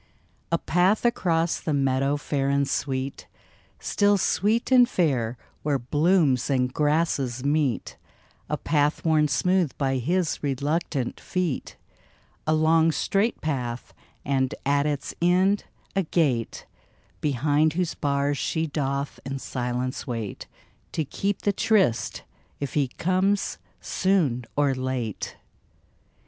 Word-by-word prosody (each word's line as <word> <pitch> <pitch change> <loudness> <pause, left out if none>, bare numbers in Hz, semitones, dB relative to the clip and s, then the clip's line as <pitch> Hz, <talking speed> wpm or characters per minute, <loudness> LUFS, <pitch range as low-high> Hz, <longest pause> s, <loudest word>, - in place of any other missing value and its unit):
A 170 - +3
path 180 +7 +2
across 170 -8 +1
the 155 - -1
meadow 135 +1 +1
fair 140 -1 -1
and 140 0 +2
sweet, 135 0 -3 0.5
Still 205 0 +2
sweet 215 +6 +1
and 250 -1 +6
fair 130 - 0 0.2
where 145 -2 +1
blooms 145 0 +2
and 125 -2 +1
grasses 145 -5 0
meet 145 -4 0 0.5
A 150 - 0
path 150 +1 0
worn 155 -2 +4
smooth 180 0 +1
by 135 -2 0
his 170 +6 0
reluctant 140 -1 -1
feet. 180 -7 -3 0.7
A 155 - +3
long, 160 +1 +4
straight 200 +9 0
path 125 -6 -3 0.2
— - - -36
and, 130 -1 0
at 140 +1 +2
its 145 -2 -3
end, 185 +4 +3 0.3
a 195 - +3
gate 145 -9 0 0.6
Behind 150 +2 +2
whose 180 0 -1
bars 140 -1 0
she 160 -1 0
doth 140 -2 -2
in 135 0 -4
silence 125 0 -3
wait 115 -5 -5 0.5
To 160 - -1
keep 195 +8 -2
the 205 - +2
tryst, 185 - +1 0.4
if 140 -2 -4
he 145 -3 +2
comes 185 +8 0 0.2
soon 160 -11 +1
or 145 -2 +2
late 130 -4 -3
145 Hz, 125 wpm, -25 LUFS, 135-170 Hz, 0.7 s, and